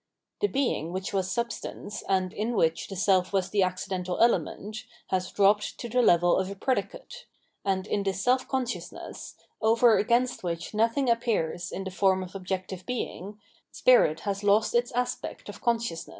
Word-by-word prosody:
The 410 Hz, -, +2 dB
Being 265 Hz, -, -1 dB
which 190 Hz, +1 st, -4 dB
was 190 Hz, -2 st, 0 dB
substance, 235 Hz, -1 st, -4 dB
and 185 Hz, -1 st, +1 dB
in 220 Hz, +4 st, -2 dB
which 165 Hz, -4 st, +1 dB
the 195 Hz, -, -7 dB
self 185 Hz, -1 st, +2 dB
was 195 Hz, -2 st, 0 dB
the 205 Hz, -, +2 dB
accidental 185 Hz, 0 st, -2 dB
element, 220 Hz, -1 st, 0 dB, 0.2 s
has 185 Hz, -1 st, -1 dB
dropped 205 Hz, +1 st, +2 dB
to 240 Hz, -, -5 dB
the 250 Hz, +2 st, +2 dB
level 175 Hz, -5 st, +4 dB
of 190 Hz, 0 st, -1 dB
a 200 Hz, -, -6 dB
predicate; -, -, -3 dB, 0.4 s
and 190 Hz, -1 st, 0 dB
in 205 Hz, -1 st, -1 dB
this 195 Hz, -1 st, -2 dB
self 250 Hz, +5 st, +2 dB
consciousness, 260 Hz, -2 st, -5 dB, 0.3 s
over 225 Hz, +1 st, +5 dB
against 240 Hz, +3 st, +1 dB
which 170 Hz, +1 st, -4 dB
nothing 230 Hz, +5 st, +1 dB
appears 220 Hz, -8 st, 0 dB
in 195 Hz, -, -4 dB
the 190 Hz, -, -5 dB
form 190 Hz, 0 st, +2 dB
of 185 Hz, -, -10 dB
objec 185 Hz, -1 st, -4 dB
tive 185 Hz, -1 st, -7 dB
Being, 210 Hz, -4 st, -5 dB, 0.3 s
spirit 200 Hz, -11 st, +4 dB
has 200 Hz, 0 st, -3 dB
lost 205 Hz, +2 st, +3 dB
its 240 Hz, +1 st, +1 dB
aspect 245 Hz, +1 st, -3 dB
of -, -, -9 dB
consciousness. 230 Hz, -8 st, -1 dB
200 Hz, 170 wpm, -27 LUFS, 185-235 Hz, 0.4 s, over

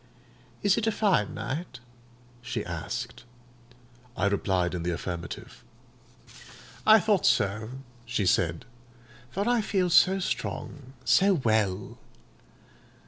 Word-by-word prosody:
"Is 200 Hz, +1 st, +3 dB
it 225 Hz, -, -2 dB
a -, -, +3 dB
fine 195 Hz, -, +1 dB
night?" 130 Hz, +5 st, -5 dB, 0.6 s
she 120 Hz, -2 st, -4 dB
asked. 85 Hz, +6 st, -5 dB, 0.9 s
I 95 Hz, -, +1 dB
replied 95 Hz, -3 st, +1 dB
in 90 Hz, -, -3 dB
the 85 Hz, -, -2 dB
affirmative. 85 Hz, +4 st, -6 dB, 1.2 s
"I 220 Hz, 0 st, +9 dB
thought 210 Hz, -4 st, +2 dB
so," 105 Hz, +1 st, +1 dB, 0.3 s
she 120 Hz, -4 st, -1 dB
said; 85 Hz, +3 st, +1 dB, 0.6 s
"for 200 Hz, -, -2 dB
I 240 Hz, -1 st, +3 dB
feel 190 Hz, -4 st, 0 dB
so 190 Hz, +3 st, +6 dB
strong, 140 Hz, -7 st, -4 dB
so 185 Hz, -, +4 dB
well. 110 Hz, -, 0 dB
120 Hz, 110 wpm, -27 LUFS, -, 1.2 s, I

